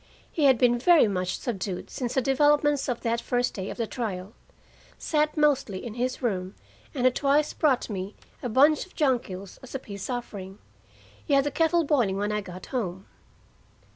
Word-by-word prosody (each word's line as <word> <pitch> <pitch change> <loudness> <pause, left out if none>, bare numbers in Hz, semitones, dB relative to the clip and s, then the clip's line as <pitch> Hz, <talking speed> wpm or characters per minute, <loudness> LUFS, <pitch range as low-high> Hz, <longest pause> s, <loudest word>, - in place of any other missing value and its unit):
He 305 - +1
had 265 -3 +6
been 240 0 +3
very 330 -1 +6
much 185 -2 -2
subdued 195 -5 -4
since 245 -2 -3
the 265 - +2
developments 290 +1 +3
of 245 - -2
that 230 0 0
first 245 0 0
day 190 0 -5
of - - -7
the 230 - -1
trial, 210 -4 -5 0.6
sat 305 0 0
mostly 270 -10 +1
in 230 - -5
his 250 +2 -1
own - - -17
room, 185 -2 -3 0.4
and 255 - -1
had 255 - +5
twice 290 +1 +2
brought 275 -5 +2
me 195 -1 -5 0.3
a 250 - -3
bunch 285 +6 +4
of - - -24
jonquils 235 - -1
as 260 - -10
a - - -1
peace 200 -4 -8
offering. 205 -6 -5 0.7
He 285 - +2
had 275 - +4
the 290 - -2
kettle 330 +3 +2
boiling 245 -11 +1
when 205 +1 -1
I 210 0 -1
got 185 -2 -9
home. 190 -6 -3
245 Hz, 190 wpm, -26 LUFS, 200-280 Hz, 0.7 s, had